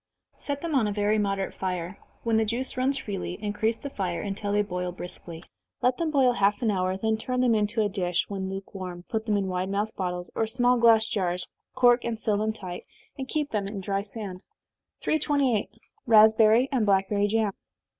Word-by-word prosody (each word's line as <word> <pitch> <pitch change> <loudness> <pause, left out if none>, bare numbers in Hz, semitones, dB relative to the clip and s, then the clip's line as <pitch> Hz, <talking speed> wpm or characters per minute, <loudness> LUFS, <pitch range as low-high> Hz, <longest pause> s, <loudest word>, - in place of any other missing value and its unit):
Set 285 -1 -4
them 335 -2 -3
on 250 -6 +3
a - - -1
very 210 +1 +1
moderate 195 -1 -1
fire 180 0 -4 0.2
when 230 -1 +2
the 220 - +3
juice 235 +5 -1
runs 265 +2 +1
freely, 190 -6 -4
increase 215 +2 -1
the 280 - -7
fire, 180 -6 -2
until 205 0 -3
they 205 0 +3
boil 180 -2 -3
briskly. 175 -2 -8 0.4
Let 250 0 +3
them 335 -2 0
boil 265 -5 +4
half 205 -1 +2
an 220 - +3
hour, 185 -1 0
then 220 +2 0
turn 250 +3 -2
them 245 -2 +4
into 215 +1 +1
a - - +2
dish 180 -3 -1
when 190 -2 -4
lukewarm, 190 -2 -7
put 220 0 -2
them 210 -1 +2
in 200 - 0
wide 185 0 -2
mouthed 205 +2 -2
bottles, 180 -1 -3
or 225 - 0
small 245 +2 +2
glass 225 -1 +6
jars, 180 -4 -1 0.3
cork 245 -1 +5
and 230 -2 -3
seal 215 -2 +1
them 215 +1 0
tight, 185 -5 -8 0.3
and 265 -1 -5
keep 295 0 -2
them 205 -2 -1
in 200 0 -5
dry 195 +1 -1
sand. 200 -3 -7 0.6
328. 280 -7 +1 0.4
_Raspberry 220 +2 +6
and 255 -5 +1
Blackberry 200 0 +2
Jam. 215 -1 +1
210 Hz, 195 wpm, -27 LUFS, 190-230 Hz, 0.6 s, glass